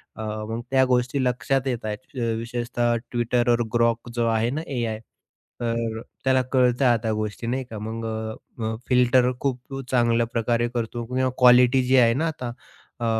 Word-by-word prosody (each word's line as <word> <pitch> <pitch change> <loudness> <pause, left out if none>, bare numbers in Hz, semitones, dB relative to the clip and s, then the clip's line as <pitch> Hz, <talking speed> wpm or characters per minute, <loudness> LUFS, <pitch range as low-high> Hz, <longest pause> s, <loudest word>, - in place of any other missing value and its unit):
अ, - - -7 0.3
मग 115 +1 -3
त्या 130 -1 +4
गोष्टी 125 +2 +1
लक्षात 135 +2 0
येत 120 -4 -2
आहेत. 110 +5 -7
अ, 115 -1 0
विशेषतः 120 0 -1 0.2
Twitterवर 120 0 +2
Grok 115 0 +1
जो 120 -1 +1
आहे 115 +1 +1
ना, 150 +5 -2
एआय. 115 -5 -2 0.6
तर 115 -1 -2 0.2
त्याला 130 -1 +3
कळतंय 125 0 +3
आता 115 -2 +2
गोष्टी. 110 +2 -4
नाही 130 +2 -1
का. 110 - -6
मग 110 +2 -5
अ, 110 0 -4 0.3
अ, 110 0 -1
फिल्टर 125 0 +4
अ, - - 0
खूप 135 0 -3
चांगल्या 120 -2 +3
प्रकारे 120 0 +1
करतो. 120 0 -3
किंवा 130 +2 0
क्वालिटी 125 +1 +6
जी 130 0 +4
आहे 115 -2 +5
ना 155 +7 0
आता 130 -7 -4 0.5
अ, 120 - -2
120 Hz, 175 wpm, -24 LUFS, 115-125 Hz, 0.6 s, क्वालिटी